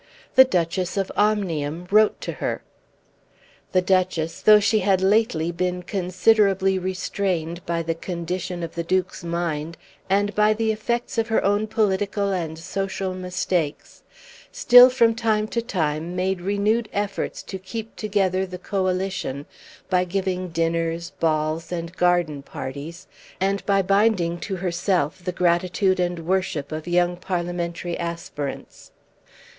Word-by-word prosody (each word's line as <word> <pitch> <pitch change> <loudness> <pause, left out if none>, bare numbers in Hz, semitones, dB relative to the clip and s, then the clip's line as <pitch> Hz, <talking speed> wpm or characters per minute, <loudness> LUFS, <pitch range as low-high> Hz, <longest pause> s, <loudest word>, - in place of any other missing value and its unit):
The 260 - +8
Duchess 180 -3 -1
of 195 -1 -1
Omnium 175 -6 0
wrote 215 +1 +4
to - - -3
her. - - -2 1.1
The 185 -1 +2
Duchess, 180 -3 0
though 215 -1 +7
she 215 +1 +2
had 190 -1 +2
lately 190 -5 +2
been 180 +1 -2
considerably 190 +1 +2
restrained 180 -2 -2
by 170 0 -1
the 165 0 -1
condition 175 +1 -4
of 165 - -5
the 170 - -2
Duke's 185 +1 -1
mind, 170 -2 -3 0.3
and 205 +1 +2
by 210 +1 +3
the 220 0 +1
effects 235 +2 -2
of 225 - 0
her 225 - +1
own 205 +2 +2
political 200 -1 0
and 165 -4 -3
social 190 +2 -3
mistakes, 180 -4 -3 0.5
still 250 - +8
from 235 -3 +3
time 220 -2 0
to 235 - -1
time 165 -6 -2
made 185 0 -1
renewed 205 +4 0
efforts 205 0 -3
to 190 - -7
keep 220 +4 -7
together 190 -3 0
the 180 0 -7
Coalition 185 -7 -2 0.4
by 180 -1 +2
giving 185 0 -2
dinners, 165 0 -1
balls, 155 +1 0
and 170 0 -4
garden 175 -5 +1
parties, 145 +5 -7 0.3
and 195 +1 0
by 195 -1 +3
binding 195 -3 +2
to 195 - -4
herself 175 -2 -1
the 180 - -2
gratitude 180 +2 +1
and 175 -2 -1
worship 180 -6 -1
of 155 +2 -5
young 175 0 +2
parliamentary 175 -1 -3
aspirants. 170 -4 -6
185 Hz, 135 wpm, -23 LUFS, 170-200 Hz, 1.1 s, The